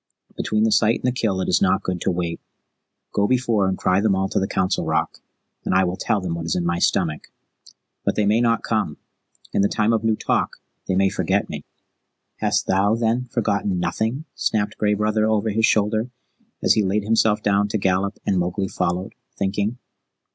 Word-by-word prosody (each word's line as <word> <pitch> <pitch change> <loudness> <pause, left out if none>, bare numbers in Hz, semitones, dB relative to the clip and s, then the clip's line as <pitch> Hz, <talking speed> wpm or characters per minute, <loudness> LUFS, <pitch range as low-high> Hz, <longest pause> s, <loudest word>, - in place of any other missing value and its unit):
Between 110 0 0
the 110 - +3
sight 110 +2 +4
and - - -8
the 125 - +2
kill 110 -6 -1
it - - -2
is 90 - +2
not 95 0 +2
good 90 -2 -3
to - - 0
wait. 85 -2 -2 0.7
Go 100 0 +2
before 115 -5 +1
and 95 - -1
cry 95 +2 +2
them 105 -2 +2
all 95 0 0
to - - 0
the 95 - -1
Council 95 -1 0
Rock, - - -1 0.4
and - - 0
I 95 - +5
will 90 0 -1
tell 105 +2 0
them 90 -3 -3
what 85 0 -4
is 80 - 0
in 90 - -1
my 85 0 0
stomach. 80 -5 0 0.8
But - - 0
they 105 - +1
may 110 +3 +3
not 115 -1 +2
come 110 -10 -1 0.6
in - - +2
the 100 - +4
Time 110 +2 +1
of 110 -1 0
New 110 -1 +2
Talk - - -1 0.3
they 95 - 0
may 95 +1 +3
forget 95 - 0
me." - - -6 0.7
"Hast - - 0
thou, 100 +3 +2
then, 115 +2 0
forgotten 100 -6 -1
nothing?" 115 - -2
snapped 105 -2 -1
Gray 105 -1 +2
Brother 110 +1 +1
over 110 0 +1
his 110 +2 +3
shoulder, 110 +3 +1 0.5
as - - +5
he 110 - +2
laid 100 +1 0
himself 110 0 +2
down 100 0 +2
to 110 - -1
gallop, 95 +1 0
and 95 - +1
Mowgli 90 +2 -1
followed, 90 +2 -2 0.2
thinking. 100 +4 -1
100 Hz, 205 wpm, -22 LUFS, 95-110 Hz, 0.8 s, I